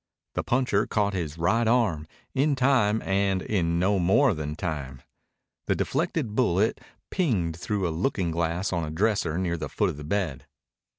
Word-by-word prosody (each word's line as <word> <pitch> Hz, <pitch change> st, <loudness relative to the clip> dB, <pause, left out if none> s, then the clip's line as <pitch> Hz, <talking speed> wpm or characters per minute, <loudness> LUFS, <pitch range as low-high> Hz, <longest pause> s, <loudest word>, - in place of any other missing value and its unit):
The -, -, -1 dB
puncher 120 Hz, -5 st, +1 dB
caught 100 Hz, -2 st, 0 dB
his 85 Hz, -4 st, -3 dB
right 110 Hz, +8 st, +2 dB
arm, 105 Hz, -11 st, +2 dB, 0.3 s
in 140 Hz, +2 st, +2 dB
time 125 Hz, -5 st, +2 dB
and 95 Hz, 0 st, +1 dB
in 85 Hz, -5 st, 0 dB
no 95 Hz, +3 st, +2 dB
more 110 Hz, +8 st, +4 dB
than 75 Hz, -2 st, -4 dB
time. 70 Hz, -7 st, -5 dB, 0.6 s
The -, -, +2 dB
deflected 155 Hz, -6 st, -1 dB
bullet 110 Hz, -3 st, +1 dB, 0.3 s
pinged 105 Hz, -, 0 dB
through 95 Hz, +2 st, -2 dB
a -, -, -2 dB
looking 90 Hz, 0 st, -1 dB
glass 85 Hz, +3 st, -1 dB
on 85 Hz, -1 st, 0 dB
a 75 Hz, -, -4 dB
dresser 90 Hz, -1 st, 0 dB
near 90 Hz, -2 st, -1 dB
the -, -, -5 dB
foot -, -, 0 dB
of -, -, -10 dB
the 75 Hz, -, -8 dB
bed. 75 Hz, -6 st, -2 dB
95 Hz, 170 wpm, -26 LUFS, 85-110 Hz, 0.6 s, more